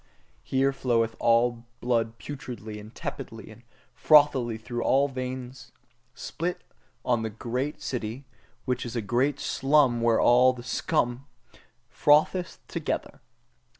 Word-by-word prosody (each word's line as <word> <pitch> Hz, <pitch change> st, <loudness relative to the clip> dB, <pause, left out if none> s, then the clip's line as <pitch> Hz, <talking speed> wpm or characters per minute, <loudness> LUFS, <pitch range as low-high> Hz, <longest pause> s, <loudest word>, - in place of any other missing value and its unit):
Here 135 Hz, +1 st, +1 dB
floweth 115 Hz, -4 st, 0 dB
all 115 Hz, 0 st, +2 dB
blood 115 Hz, -2 st, 0 dB
putridly 120 Hz, -8 st, -7 dB
and 105 Hz, +1 st, -11 dB
tepidly -, -, -7 dB
and -, -, -15 dB, 0.3 s
frothily 135 Hz, -6 st, +4 dB
through 120 Hz, +1 st, -5 dB
all 135 Hz, +3 st, +3 dB
veins: 130 Hz, -1 st, -7 dB, 0.4 s
spit 175 Hz, +5 st, -4 dB, 0.4 s
on 120 Hz, -2 st, +2 dB
the 110 Hz, -, -2 dB
great 125 Hz, +6 st, -4 dB
city, 120 Hz, +2 st, -4 dB, 0.4 s
which 125 Hz, -2 st, -1 dB
is 120 Hz, -1 st, -6 dB
the 115 Hz, -, -1 dB
great 130 Hz, +6 st, 0 dB
slum 135 Hz, -4 st, +2 dB
where 115 Hz, -1 st, +3 dB
all 125 Hz, +1 st, +5 dB
the 120 Hz, -1 st, -10 dB
scum 125 Hz, +1 st, -1 dB, 0.6 s
frotheth 155 Hz, +5 st, +2 dB
together! -, -, -4 dB
125 Hz, 120 wpm, -27 LUFS, 115-135 Hz, 0.6 s, all